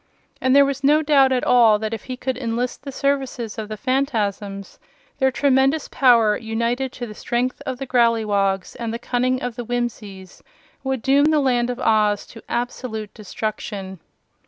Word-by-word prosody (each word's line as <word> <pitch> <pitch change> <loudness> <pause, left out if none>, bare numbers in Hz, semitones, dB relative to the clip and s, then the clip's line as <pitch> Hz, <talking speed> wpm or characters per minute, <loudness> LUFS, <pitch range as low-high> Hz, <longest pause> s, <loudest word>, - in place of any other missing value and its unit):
And 260 +1 +3
there 280 0 +7
was 275 0 -3
no 300 +3 +4
doubt 275 -3 +4
at 255 -1 +1
all 235 -4 +5
that 220 +1 -4
if 225 - -6
he 255 -1 -6
could 260 0 -2
enlist 245 0 -3
the 275 - -7
services 265 -5 -2
of 215 -1 -6
the 215 - -5
Phanfasms, 210 -6 -2 0.4
their 265 -1 +4
tremendous 270 +2 +2
power, 230 -5 +4
united 235 +3 -2
to 245 - -6
the 215 - -9
strength 245 +4 -2
of 260 -1 -3
the 270 - -5
Growleywogs 215 -6 +1
and 230 -1 -4
the 230 - -3
cunning 250 +1 -1
of 245 -2 -3
the 240 - -3
Whimsies 215 -6 -5 0.4
would 265 -3 -2
doom 280 +2 +4
the 310 0 +3
Land 245 -3 +1
of 250 0 -4
Oz 210 -3 +2
to 225 - -11
absolute 235 -3 -4
destruction. 205 -2 -5
245 Hz, 175 wpm, -21 LUFS, 220-265 Hz, 0.4 s, there